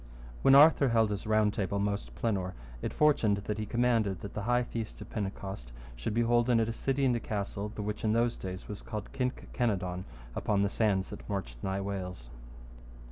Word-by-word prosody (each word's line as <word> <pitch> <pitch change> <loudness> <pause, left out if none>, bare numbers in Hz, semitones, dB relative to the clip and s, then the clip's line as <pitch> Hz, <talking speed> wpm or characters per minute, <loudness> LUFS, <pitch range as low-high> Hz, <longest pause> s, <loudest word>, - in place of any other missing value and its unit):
When 135 - +7
Arthur 145 -1 +7
held 110 -2 +3
his 105 +1 -4
Round 110 -1 +3
Table 100 -3 -1
most 100 0 -2
plenour, 95 -5 -1 0.3
it - - -2
fortuned 140 -9 +3
that 105 +1 -3
he 105 - -3
commanded 115 -5 +1
that 100 - -7
the 105 - -3
high 120 +3 +2
feast 115 -2 -5
of - - -10
Pentecost 95 - -4 0.2
should - - -3
be 120 - +3
holden 120 0 +3
at 110 - +2
a 115 - -2
city 135 +3 0
and 125 -2 +3
a - - 0
castle, 105 -1 -3
the 105 - -4
which 105 0 -4
in 110 -1 +2
those 115 +1 +2
days 95 0 -6
was 105 - -6
called 105 -3 -6
Kynke 125 -2 -3
Kenadonne, 90 -6 -1 0.3
upon 100 -1 +1
the 100 - +2
sands 100 -3 +1
that - - -9
marched - - -4
nigh 95 +1 -1
Wales. 90 -11 -5
105 Hz, 200 wpm, -31 LUFS, 100-115 Hz, 0.3 s, When